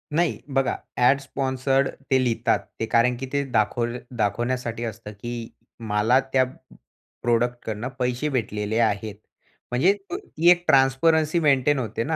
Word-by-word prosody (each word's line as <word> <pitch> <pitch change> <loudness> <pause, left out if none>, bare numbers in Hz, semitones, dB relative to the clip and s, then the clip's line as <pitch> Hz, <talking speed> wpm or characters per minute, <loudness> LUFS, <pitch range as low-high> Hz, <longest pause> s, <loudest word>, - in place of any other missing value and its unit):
नाही, 170 +1 +1
बघा 135 -1 0 0.2
add 125 +3 +4
sponsored 135 0 0 0.2
ते 130 - +5
लिहितात. 115 -1 +1 0.2
ते 115 - 0
कारण 120 +2 +3
की 135 - -5
ते 140 0 +1
दाखव 120 +1 0 0.2
दाखवण्यासाठी 120 +2 -1
असतं, 115 -2 -6
की 115 +2 -6 0.4
मला 105 +5 +3
त्या 130 -1 +5 0.8
प्रॉडक्टकडनं 120 -1 -1
पैसे 125 +4 -1
भेटलेले 105 -4 -2
आहेत. 105 -2 0 0.6
म्हणजे 135 +11 +4 0.2
अ, - - -2
ती 175 - +1
एक 175 0 +3
ट्रान्सपरन्सी 155 +5 +3
मेंटेन 145 -2 +3
होते 115 -1 -3
ना? 160 +4 -1
125 Hz, 140 wpm, -24 LUFS, 115-135 Hz, 0.8 s, ते